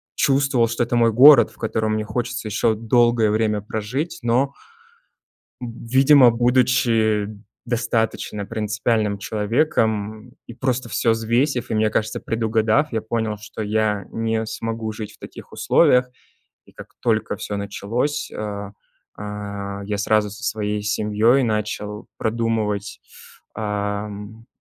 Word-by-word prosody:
чувствовал, 135 -4 +2
что 120 +1 -1
это 120 +1 -2
мой 115 -1 +4
город, 135 +3 +8
в - - -21
котором 110 -1 -1
мне 110 0 -2
хочется 120 +1 -3
еще 110 +1 +1
долгое 115 0 +3
время 105 -1 0
прожить, 110 - -4
но 125 +4 +1 1.1
видимо, 125 +3 +4
будучи 115 -3 +2 0.4
достаточно 115 -3 -1
принципиальным 110 0 -1
человеком 110 0 -1
и - - -10
просто 125 0 -2
всё 115 +1 +1
взвесив, 120 +4 0
и, - - 0
мне 110 0 +2
кажется, 110 0 -1
предугадав, 115 +5 +1
я 110 - 0
понял, 110 -1 -2
что 105 +1 -8
я 105 -2 0
не 115 0 -1
смогу 110 0 -4
жить 105 0 -7
в - - -19
таких - - -11
условиях. 125 0 +3 0.6
И - - -20
как - - -13
только 110 -2 0
всё 105 - -5
началось, 115 +8 -2
а, 100 -1 -5 0.5
а, 100 -1 -6
я 105 0 -3
сразу 105 0 +1
со 110 +4 -11
своей 105 -3 -2
семьёй 105 +4 +2
начал 105 -2 -3
продумывать, 110 -3 -2 0.5
а, 105 -1 -2
м, 105 +2 -10
110 Hz, 130 wpm, -22 LUFS, 105-120 Hz, 1.1 s, город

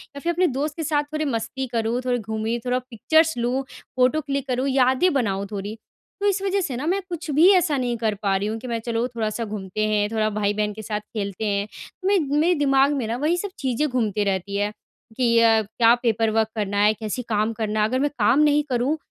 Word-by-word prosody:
या - - -6
फिर 340 +4 -1
अपने 360 +2 +2
दोस्त 285 +2 -2
के 325 - -3
साथ 295 -2 +1
थोड़ी 310 0 -1
मस्ती 245 0 -3
करूँ, 235 0 -1
थोड़ी 245 -1 +1
घूमी, 220 +2 -2
थोड़ा 250 0 +1
पिक्चर्स 315 +7 +2
लूँ, 245 +3 0 0.3
फोटो 255 +5 +3
क्लिक 275 0 -3
करूँ, 255 +1 0
यादें 265 +6 +3
बनाऊँ 200 -7 0
थोड़ी। 205 +1 -5 0.5
तो 410 - +2
इस 390 -1 +1
वज़ह 395 0 0
से 280 -8 -3
ना 275 - -4
मैं 390 +3 +1
कुछ 340 -1 -6
भी 310 +6 +5
ऐसा 335 -6 +2
नहीं 245 -2 -1
कर 220 -2 -1
पा 195 -1 +2
रही 200 - -2
हूँ 220 +1 -2
कि 255 - -8
मैं 230 -1 -2
चलो 230 +1 -1
थोड़ा-सा 230 -1 -3
घूमते 210 0 -3
हैं, 210 -1 +1
थोड़ा 215 -1 +1
भाई-बहन 210 0 -1
के 220 - -8
साथ 210 0 -3
खेलते 210 -1 -5
हैं। 200 0 0 0.4
मैं 395 0 +4 0.2
मेरे 340 +4 +3
दिमाग 275 0 +3
में 260 -5 -2
ना 230 +2 -2
वही 310 +6 +1
सब 405 +3 -3
चीज़ें 265 +2 0
घूमते 220 -5 0
रहती 200 0 -2
है 205 +1 0 0.5
कि 235 -2 +3
अ, 225 -1 +5
क्या 225 +3 +3
पेपर 225 -1 +2
वर्क 220 0 +2
करना 205 -1 -2
है? 210 +1 +4
कैसे 220 +3 -4
काम 215 +1 +1
करना 215 -1 -2
है? 210 - +3
अगर 255 +3 -1
मैं 290 +1 +1
काम 225 +6 +4
नहीं 295 0 +4
करूँ 255 +5 0
235 Hz, 230 wpm, -23 LUFS, 215-280 Hz, 0.5 s, भी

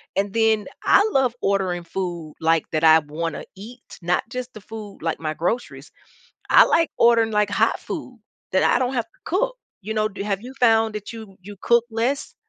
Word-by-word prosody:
and 200 0 -1
then 220 -2 +2 0.2
I 415 - +5
love 260 -5 +2
ordering 190 -3 0
food 170 -4 -5
like, 165 -1 +3
that 155 0 -1
I 160 0 +8
wanna 155 +2 -5
eat, 240 +5 -11 0.2
not 175 +1 0
just 255 0 -5
the 215 - -11
food, 215 -1 -10
like 165 0 -2
my 155 -1 -3
groceries. 200 +10 -3 0.6
I - - +8
like 330 -1 +2
ordering, 230 -1 +4
like, 210 -1 +1
hot - - +1
food 260 -8 -7 0.3
that 190 - +3
I - - +3
don't 255 +1 -1
have 235 -2 0
to - - -33
cook, - - 0 0.3
you 220 +3 -4
know, 215 0 +1
do 200 -1 -7
have 200 -1 -2
you 255 +2 -9
found 225 -2 +4
that 210 +2 -6
you 220 -4 -11
you 205 +1 -10
cook 235 0 +3
less? 240 +6 -2
215 Hz, 195 wpm, -22 LUFS, 185-235 Hz, 0.6 s, I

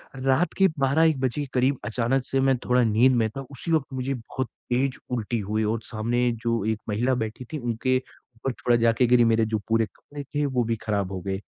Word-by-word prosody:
रात 135 +6 +1
के 195 - +6
12-1 145 +2 +3
बजे 130 +2 0
के 145 - -4
करीब 130 +2 +2
अचानक 120 +3 0
से 135 - 0
मैं 135 -1 +3
थोड़ा 125 0 +3
नींद 120 +4 +4
में 115 -2 +2
था 135 +5 -7
उसी 140 +5 -5
वक्त 155 -4 +2
मुझे 130 +1 -2
बहुत 130 +1 -4 0.3
तेज 130 +1 +1
उल्टी 120 -1 -1
हुई 105 +2 -1
और 110 +2 0
सामने 120 +3 0
जो 115 -3 0
एक 110 -1 0
महिला 120 +5 +1
बैठी 115 +1 -4
थीं, 155 - -2
उनके 120 +1 0
ऊपर 130 0 -7
थोड़ा 120 0 +1
जा 115 0 +4
के 125 +2 +3
गिरी 120 0 +5
मेरे 115 0 +3
जो 110 -1 -1
पूरे 115 0 +2
कपड़े 145 0 -9
थे 145 +2 -2
वो 130 -3 +1
भी 115 0 -1
खराब 100 -3 -1
हो 95 -2 -4
गए। 95 +1 -3
125 Hz, 225 wpm, -25 LUFS, 115-135 Hz, 0.3 s, के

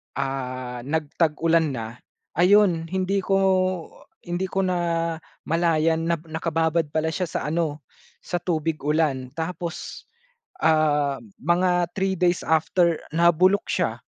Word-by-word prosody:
ah, 130 -2 -4
nagtag-ulan 160 +1 +1
na 110 -1 -4 0.5
ayon 180 -3 +4
hindi 190 +2 0
ko 195 +1 0 0.9
hindi 175 +2 -2
ko 195 +1 -1
namalayan 165 -2 0
na 170 - +2
nakababad 160 0 0
pala 160 +2 -1
siya 180 +1 -2
sa - - -3
ano 155 -3 -1 0.4
sa 175 - -2
tubig 165 -2 -1
ulan 145 -3 0
tapos, 170 +1 -5 0.6
ah, 150 -3 +2 0.2
mga 175 +2 +2
3 190 0 +1
days 180 -1 +2
after 165 +1 +2
nabulok 170 +4 +3
siya. - - 0
165 Hz, 110 wpm, -24 LUFS, 155-175 Hz, 0.9 s, ayon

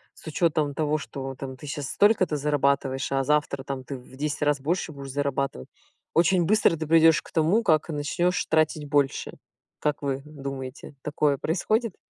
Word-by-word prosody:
с - - -17
учётом 155 -2 +1
того, 155 +1 0
что 135 -2 -6
там 130 0 -7
ты 150 - -10
сейчас 145 -1 -4
столько-то 200 -7 +3
зарабатываешь, 140 -2 0
а 135 0 +1
завтра 150 -1 0
там 135 -1 -5
ты 135 +1 -6
в 125 +1 -15
10 145 +2 -3
раз 145 -1 +1
больше 165 +3 -1
будешь 140 -2 -8
зарабатывать. 140 -1 -2 0.5
Очень 175 +1 +3
быстро 205 -3 +3
ты 160 0 -4
придёшь 160 -3 +6
к - - -16
тому, 165 +8 +3
как 155 -4 +2
начнёшь 160 +3 0
тратить 155 -1 +1
больше. 140 -1 0 0.5
Как 150 -1 -1
вы 135 -1 -2
думаете, 135 -2 -7
такое 150 -1 +1
происходит? 215 - 0
145 Hz, 170 wpm, -26 LUFS, 135-160 Hz, 0.5 s, придёшь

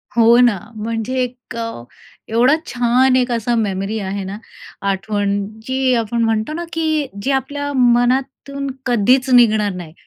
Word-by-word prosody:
हो 235 0 +6
ना, 240 -5 +4 0.3
म्हणजे 230 +2 -3
1 245 -1 -8
अ, 230 - -2 0.6
एवढा 245 +6 +4
छान 250 +1 +2
1 250 -1 +1
असा 235 +1 0
मेमरी 200 -1 -1
आहे 195 0 -4
ना, 195 +2 -6 0.5
आठवण, 200 0 -1 0.3
जी 260 0 +1
आपण 230 +1 -2
म्हणतो 225 +5 0
ना, 340 +2 -4
की 315 -3 0
जी 275 - -1
आपल्या 285 +2 -2
मनातून 260 +3 +1 0.2
कधीच 250 +3 +2
निघणार 220 -4 +4
नाही, 170 -3 -9
240 Hz, 145 wpm, -18 LUFS, 215-260 Hz, 0.6 s, हो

